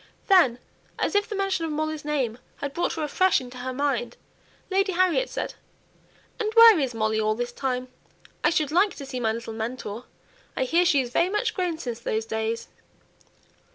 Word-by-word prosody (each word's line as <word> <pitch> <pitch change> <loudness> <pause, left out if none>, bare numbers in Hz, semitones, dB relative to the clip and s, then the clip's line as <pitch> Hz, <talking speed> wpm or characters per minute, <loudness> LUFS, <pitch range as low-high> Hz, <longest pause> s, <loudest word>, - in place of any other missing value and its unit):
Then, 345 -12 +5 0.4
as - - -1
if 410 +1 +1
the 425 - -3
mention 390 -3 0
of 325 - -2
Molly's 310 0 -2
name 265 -6 -1 0.2
had 285 -1 -5
brought 345 - -1
her 320 - -3
afresh 370 +5 +3
into 250 0 -10
her 255 +1 -4
mind, 255 -3 -1 0.5
Lady 390 0 +2
Harriet 370 +7 +2
said, - - -4 0.9
"And 430 -1 -1
where 460 -5 +9
is 260 -4 -1
Molly 220 0 0
all 215 0 +1
this 240 +1 -3
time? 255 -1 -2 0.6
I - - +5
should 310 -4 0
like 370 +4 +3
to 280 - -8
see 265 -2 -5
my 225 -2 +1
little 230 0 -5
mentor. 225 0 -5 0.5
I - - +2
hear 335 +7 +2
she 285 -5 +4
is 245 -2 -6
very 340 +7 +2
much 420 +3 0
grown 360 -4 -1
since 240 -7 -5
those 220 -1 -2
days." 220 +1 -3
280 Hz, 190 wpm, -25 LUFS, 240-360 Hz, 0.9 s, where